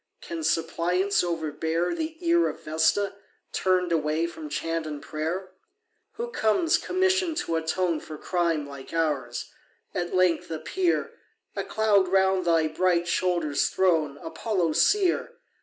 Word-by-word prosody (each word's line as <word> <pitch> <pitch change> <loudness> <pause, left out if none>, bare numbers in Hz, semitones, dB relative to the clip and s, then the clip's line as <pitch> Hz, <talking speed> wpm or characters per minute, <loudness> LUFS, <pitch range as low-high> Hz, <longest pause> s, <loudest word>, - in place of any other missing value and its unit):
Can 335 -1 -6
suppliance 180 - +1
overbear 165 0 -1
The 320 -1 -4
ear 340 0 +4
of - - -9
Vesta, 160 +6 +1 0.4
turn'd 185 -2 +1
away 155 0 +1
From 160 -3 -7
chant 165 +1 -2
and 150 -1 -5
prayer? 165 +6 -4 0.6
Who 475 +2 -5
comes, 320 - +2
commission'd 370 -3 +1
to 165 - -1
atone 165 +1 0
For 155 0 -9
crime 165 -4 0
like 140 +1 -10
ours? 150 -6 -1 0.4
at 175 0 -2
length 185 -2 +2
appear, 165 - -1 0.4
A - - -2
cloud 210 -3 +2
round 190 0 +2
thy 165 -2 +3
bright 175 +2 +1
shoulders 175 -5 +1
thrown, 160 -6 +1
Apollo 180 +1 -1
seer! 375 - +2
175 Hz, 130 wpm, -26 LUFS, 160-200 Hz, 0.6 s, ear